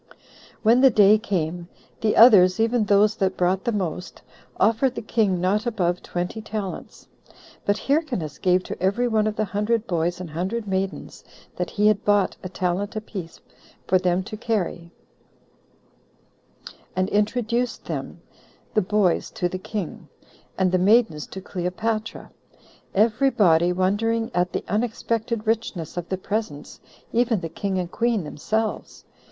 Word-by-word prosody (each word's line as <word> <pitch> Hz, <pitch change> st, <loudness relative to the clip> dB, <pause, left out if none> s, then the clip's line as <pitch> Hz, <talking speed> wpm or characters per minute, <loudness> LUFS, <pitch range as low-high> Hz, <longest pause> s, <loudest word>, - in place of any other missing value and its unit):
When 235 Hz, +3 st, +5 dB
the 265 Hz, -, +8 dB
day 210 Hz, -2 st, +5 dB
came, 175 Hz, -5 st, -3 dB, 0.3 s
the 215 Hz, -1 st, +1 dB
others, 200 Hz, -5 st, +7 dB
even 225 Hz, 0 st, +2 dB
those 205 Hz, +1 st, +4 dB
that 190 Hz, -2 st, 0 dB
brought 185 Hz, +1 st, +1 dB
the 235 Hz, -, +1 dB
most, 185 Hz, -4 st, -4 dB, 0.4 s
offered 230 Hz, +4 st, +2 dB
the -, -, -4 dB
king 210 Hz, -4 st, +1 dB
not 205 Hz, +6 st, 0 dB
above 180 Hz, -6 st, 0 dB
twenty 180 Hz, +5 st, -4 dB
talents; 210 Hz, -3 st, -6 dB, 0.6 s
but 205 Hz, 0 st, +2 dB
Hyrcanus 260 Hz, -, -1 dB
gave 185 Hz, 0 st, +2 dB
to -, -, -7 dB
every 200 Hz, +7 st, +1 dB
one 215 Hz, -2 st, +1 dB
of 215 Hz, -, -2 dB
the 215 Hz, -, 0 dB
hundred 210 Hz, +3 st, -1 dB
boys 175 Hz, -2 st, -1 dB
and 180 Hz, -4 st, -7 dB
hundred 190 Hz, +8 st, -3 dB
maidens 190 Hz, 0 st, -3 dB, 0.3 s
that -, -, -3 dB
he 210 Hz, -1 st, 0 dB
had 210 Hz, -1 st, +3 dB
bought 205 Hz, -2 st, +2 dB
a 185 Hz, -, -6 dB
talent 185 Hz, +4 st, -2 dB
apiece, 195 Hz, -6 st, -7 dB, 0.4 s
for 185 Hz, -, +3 dB
them 180 Hz, 0 st, +1 dB
to 215 Hz, -, -7 dB
carry, 205 Hz, -6 st, -2 dB, 2.1 s
and 185 Hz, 0 st, +1 dB
introduced 235 Hz, +3 st, -1 dB
them, -, -, -5 dB, 0.5 s
the 215 Hz, -, +3 dB
boys 200 Hz, -2 st, +1 dB
to 180 Hz, -, -2 dB
the 185 Hz, +1 st, -5 dB
king, 190 Hz, -2 st, -6 dB, 0.5 s
and 185 Hz, -1 st, +2 dB
the 185 Hz, -, +2 dB
maidens 195 Hz, -6 st, +3 dB
to 190 Hz, -, -8 dB
Cleopatra; 210 Hz, +5 st, -3 dB, 0.6 s
every 230 Hz, +6 st, +3 dB
body 175 Hz, -8 st, +3 dB
wondering 215 Hz, +5 st, 0 dB
at 180 Hz, 0 st, +1 dB
the -, -, -4 dB
unexpected 225 Hz, +1 st, -2 dB
richness 220 Hz, -7 st, -2 dB
of 175 Hz, -1 st, -5 dB
the 190 Hz, -, -1 dB
presents, 195 Hz, -7 st, -4 dB, 0.3 s
even 235 Hz, -2 st, +2 dB
the 165 Hz, -, -4 dB
king 190 Hz, +3 st, -3 dB
and 175 Hz, -1 st, -3 dB
queen 230 Hz, -4 st, 0 dB
themselves. 215 Hz, +9 st, -3 dB
205 Hz, 145 wpm, -23 LUFS, 180-225 Hz, 2.1 s, the